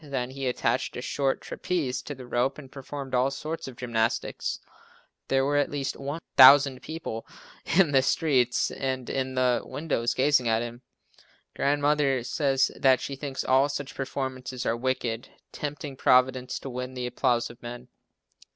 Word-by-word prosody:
Then 130 -4 -3
he 135 0 -4
attached 125 - -1
a - - -4
short 135 -2 -1
trapeze 135 -9 -2
to 145 +3 -7
the 130 -1 -10
rope 125 +2 0
and 135 -3 -11
performed 135 0 -7
all 125 +1 +3
sorts 155 +4 -5
of 130 - -8
gymnastics. 115 -2 -1 0.7
There 135 0 +2
were 145 +1 +1
at 145 - +2
least 140 -1 -3
1,000 140 -2 +5
people 155 -8 -6 0.5
in 185 -6 +5
the 135 -2 +5
street 130 -3 +2
and 130 -2 -3
in 130 -1 -2
the 125 -1 +2
windows 140 -6 -2
gazing 130 -2 +3
at 110 +1 +2
him. 120 +1 -7 0.7
Grandmother 145 -2 +2
says 135 +1 +1
that 130 -1 +4
she 140 - -5
thinks 135 -1 -4
all 135 +2 +3
such 140 -1 -5
performances 130 -1 -4
are 115 - +1
wicked, 120 -1 -2 0.2
tempting 145 -1 -5
Providence 130 0 +2
to 135 - -6
win 125 +1 -5
the 125 -1 -3
applause 125 -1 0
of 120 - -17
men. 120 +1 -8
130 Hz, 160 wpm, -27 LUFS, 125-140 Hz, 0.7 s, 1,000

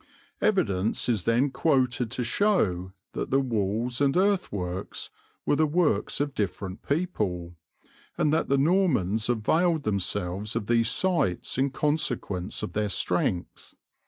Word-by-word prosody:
Evidence 110 - +1
is 110 -7 0
then 120 +5 +2
quoted 130 -4 +1
to 125 +1 -2
show 105 - +1 0.2
that - - -3
the 135 - +3
walls 115 0 -1
and 140 +2 +3
earthworks 105 - -1 0.3
were - - +3
the 155 +1 +3
works 150 - +1
of 145 -1 -1
different 95 -3 -3
people, 105 - -2 0.6
and 150 - +2
that 160 - +1
the 140 - +3
Normans 135 - +2
availed 155 +8 +2
themselves 100 0 -1
of - - -1
these 115 0 +2
sites 150 - 0
in 135 +1 +2
consequence 130 - -1
of 105 - -4
their 105 0 0
strength. 90 -2 -2
120 Hz, 130 wpm, -27 LUFS, 100-150 Hz, 0.6 s, the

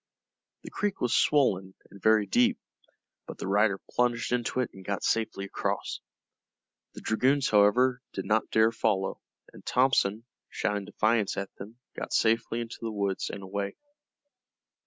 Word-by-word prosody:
The - - -9
creek 205 -2 -2
was 125 - 0
swollen 95 -10 +2 0.2
and 100 - -14
very 110 -1 +4
deep, 120 +5 +3 0.7
but - - -8
the - - -5
rider 100 0 +2
plunged 120 -1 0
into 125 +1 0
it 125 - -3
and 95 - -12
got 100 +1 -3
safely 110 -3 0
across. 95 - -3 1.0
The - - -8
dragoons, 135 +5 +2
however, 125 +5 +4
did - - -4
not 110 +1 +1
dare 110 +1 +4
follow, 105 -4 -1 0.3
and - - -14
Thompson, 115 -4 +2 0.2
shouting 105 -1 -2
defiance 110 0 +1
at 100 0 -4
them, 105 +4 -10 0.2
got - - -5
safely 115 +1 +1
into 115 -1 -7
the 115 - -3
woods 100 -2 -2
and 100 - -7
away. 100 +1 -4
110 Hz, 150 wpm, -28 LUFS, 100-120 Hz, 1.0 s, very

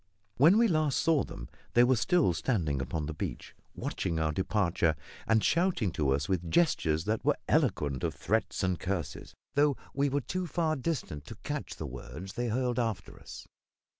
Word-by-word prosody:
When 165 - +6
we 235 0 +5
last 155 -6 +1
saw 160 -4 +3
them - - -8 0.3
they 120 - +7
were 130 +1 +4
still 155 - +3
standing 80 - 0
upon 75 +3 -3
the 80 - -4
beach, - - -5 0.2
watching 85 -3 -2
our 80 -1 +1
departure, 85 -2 +1 0.3
and 110 -1 +3
shouting 170 - +2
to 75 -4 0
us 70 +2 +1
with 90 -3 -1
gestures 80 - +2
that 110 +1 -1
were - - +2
eloquent 70 -3 +1
of - - -1
threats - - -1
and 95 -2 0
curses, 95 -3 -4 0.2
though 145 -1 +3 0.2
we 140 +1 +1
were 140 +1 0
too 185 +6 -3
far 160 -2 0
distant 125 - -3
to - - -8
catch - - -4
the - - -6
words 80 +9 -8
that 120 - -3
they 120 - 0
hurled 125 +1 0
after 115 -4 -3
us. - - -10
110 Hz, 185 wpm, -30 LUFS, -, 0.3 s, they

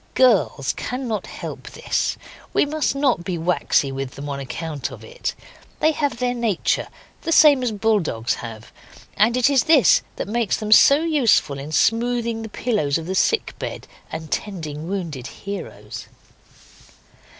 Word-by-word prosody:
Girls 175 - +3
cannot 250 -5 -4
help - - -8
this; - - -1 0.4
we - - +3
must 300 -1 -1
not 270 -10 +1
be 175 -1 -3
waxy 165 -4 +1
with 135 -1 -5
them 145 +1 -6
on 140 -1 -3
account 145 +2 -4
of - - -11
it, - - -5 0.4
they 315 - +4
have 290 -4 -1
their 250 0 0
nature, 230 -7 0 0.3
the 330 - -3
same 295 -4 +7
as 245 -2 0
bull 215 +1 +2
dogs 120 - -2
have, 115 -2 -9 0.4
and 230 +4 +3
it 250 - +4
is 275 -3 +3
this - - +6
that - - -4
makes 225 -1 0
them 215 -1 -4
so 280 +7 +7
useful 250 - +2
in 145 +3 -7
smoothing 230 +4 +1
the 220 - -6
pillows 205 - 0
of 165 - -6
the 185 - -3
sick 450 - +1
bed - - -6 0.2
and 160 -1 -6
tending 160 -6 -4
wounded 165 -10 -4
heroes. 200 0 -8
215 Hz, 160 wpm, -22 LUFS, 155-250 Hz, 0.4 s, same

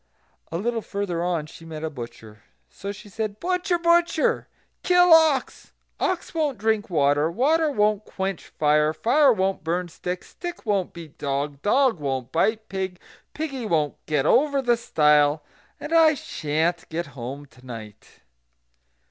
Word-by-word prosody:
A 165 - -2
little 230 +4 -1
further 200 -5 -3
on 175 -4 -1
she 160 +1 -13
met 160 -1 -8
a 160 - -1
butcher. 115 -5 -10 0.3
So 200 - -6
she 205 - -11
said: 215 0 -4
"Butcher! 360 0 0
butcher! 340 -1 +2 0.3
kill 360 -1 +5
ox; 315 -5 +3 0.3
ox 370 -2 -1
won't 300 -6 0
drink 220 0 0
water; 145 -1 +2
water 305 - +2
won't 210 -4 +1
quench 190 -2 -4
fire; 150 0 +2
fire 270 - +4
won't 195 -5 0
burn 175 +2 -1
stick; 180 +2 -5
stick 350 -4 -8
won't 200 -4 0
beat 165 -4 -12
dog; 140 0 -2
dog 255 - +3
won't 135 -4 -3
bite 220 +6 +1
pig; 190 -2 -4 0.4
piggy 275 -7 -4
won't 155 -6 -1
get 150 -3 +1
over 280 - +3
the 245 -3 +3
stile; 150 -8 +3 0.4
and 300 +2 -5
I 320 -2 +6
sha'n't 165 - -2
get 170 +2 -3
home 135 +3 -7
to 130 -2 -21
night." 110 -5 -11
190 Hz, 150 wpm, -24 LUFS, -, 0.4 s, I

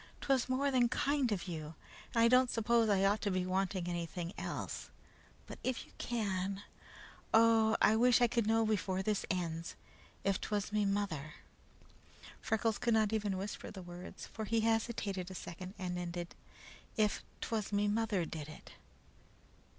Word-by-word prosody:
"'Twas 265 -2 +1
more 275 +2 +2
than 245 -2 +4
kind 275 -2 +1
of 195 -2 -2
You 160 -2 -5 0.4
and 230 - +3
I - - +7
don't 250 +1 +5
s'pose 230 -1 +3
I 195 -1 +4
ought 205 +2 +2
to 205 - 0
be 185 -1 0
wanting 185 -1 0
anything 175 +1 -3
else; - - -4 0.6
but - - -9
if 255 -2 -1
You - - -20
can, 200 -4 -2 0.7
oh, 225 -1 +5
I 215 - +6
wish 245 +1 +5
I 245 - +6
could 235 -2 +1
know 225 0 +3
before 190 -3 0
this 210 0 0
ends, 170 -3 -2 0.5
if 195 0 +1
'twas 210 -1 -2
me 210 -1 +2
mother" 195 -8 -1 1.1
Freckles 220 0 0
could 235 -2 +2
not 215 -1 +3
even 205 -3 0
whisper 200 +2 -5
the 190 -3 -8
words, 175 +1 -8
for 220 - -6
he 225 +1 +1
hesitated 220 -4 0
a 185 - -8
second 185 +3 -7
and 180 -1 -3
ended 175 0 -4 0.6
"IF 210 -1 +2 0.2
'TWAS 215 -3 -2
ME 205 0 +2
MOTHER 205 -4 +1
DID 155 -2 -6
IT!" 155 - -12
205 Hz, 165 wpm, -34 LUFS, 185-225 Hz, 1.1 s, I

